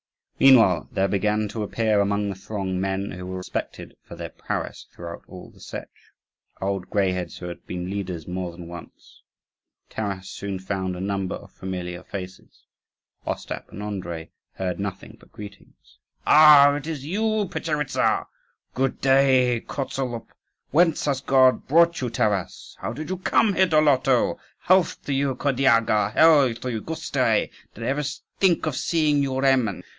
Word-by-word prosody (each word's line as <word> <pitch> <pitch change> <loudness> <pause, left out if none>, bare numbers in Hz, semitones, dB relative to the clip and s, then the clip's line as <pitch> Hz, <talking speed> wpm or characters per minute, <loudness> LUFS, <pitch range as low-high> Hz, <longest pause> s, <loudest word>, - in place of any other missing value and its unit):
Meanwhile 115 -10 +6
there 95 0 +1
began 105 +2 0
to 110 - -5
appear 110 0 +1
among 100 0 +1
the - - -3
throng 95 -1 -4
men 95 +1 -2
who 90 0 -7
were 95 0 -5
respected 90 - -6
for - - -12
their - - -6
prowess - - -5
throughout 85 -1 -8
all 90 -1 -11
the - - -21
Setch - - -7 0.7
old 95 -1 -3
greyheads 90 -3 -1
who 90 - -7
had 85 - -9
been 90 +1 -4
leaders 90 -5 -5
more 90 -1 -4
than 85 0 -10
once. 85 -1 -12 0.7
Taras 100 -3 -4
soon 100 -1 -5
found 95 -1 -3
a - - -7
number 95 -1 -2
of - - -12
familiar 90 -2 -6
faces. 95 -1 -9 0.6
Ostap - - -5
and 105 - -7
Andrii 85 -6 -5 0.2
heard 95 -1 -3
nothing 100 -1 -6
but - - -21
greetings. 100 -1 -13 0.3
"Ah, 150 -2 +8
it 145 +1 -4
is 150 -4 -5
you, 215 +5 0
Petcheritza! 150 -5 0 0.5
Good 135 0 -1
day, 130 -3 +3
Kozolup!" 130 -4 -4 0.4
"Whence 165 +1 +3
has 140 -3 0
God 130 -2 +3
brought 170 +2 +4
you, 125 - -1
Taras?" 100 -5 -2
"How 115 - -4
did 155 +7 -6
you 185 - -2
come 205 +2 +2
here, 190 0 +3
Doloto? 145 -5 +3 0.2
Health 185 -1 +2
to 140 - -2
you, 135 -1 0
Kirdyaga! 120 -6 +2
Hail 145 -7 +5
to 125 +2 -5
you, 110 -2 -3
Gustui! 160 +6 0 0.2
Did 115 - -8
I - - -2
ever 140 +3 0 0.4
think 185 -4 +3
of 155 -4 -2
seeing 150 -2 +1
you, 135 -1 -1
Remen?" 130 -6 +2
110 Hz, 160 wpm, -24 LUFS, 95-140 Hz, 0.7 s, Ah